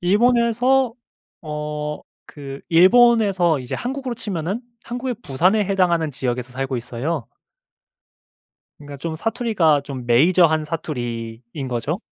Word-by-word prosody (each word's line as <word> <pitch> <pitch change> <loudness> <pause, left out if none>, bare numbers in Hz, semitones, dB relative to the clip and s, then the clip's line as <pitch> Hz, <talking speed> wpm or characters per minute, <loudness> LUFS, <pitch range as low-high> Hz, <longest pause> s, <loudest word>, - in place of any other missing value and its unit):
일본에서 235 +5 +3 0.5
어 150 -1 -4 0.3
그 140 -2 -9
일본에서 190 - +5
이제 125 - -5
한국으로 260 0 -4
치면은 195 0 -3 0.2
한국의 245 0 -4
부산에 180 +10 +2
해당하는 175 -5 +1
지역에서 125 -2 -3
살고 135 0 -2
있어요. 125 +4 -4 1.5
그러니까 145 -1 -10
좀 160 +3 -4
사투리가 190 - +1
좀 135 -3 -6
메이저한 160 +5 +4
사투리인거죠. 120 -1 -4
160 Hz, 285 characters per minute, -21 LUFS, 135-215 Hz, 1.5 s, 일본에서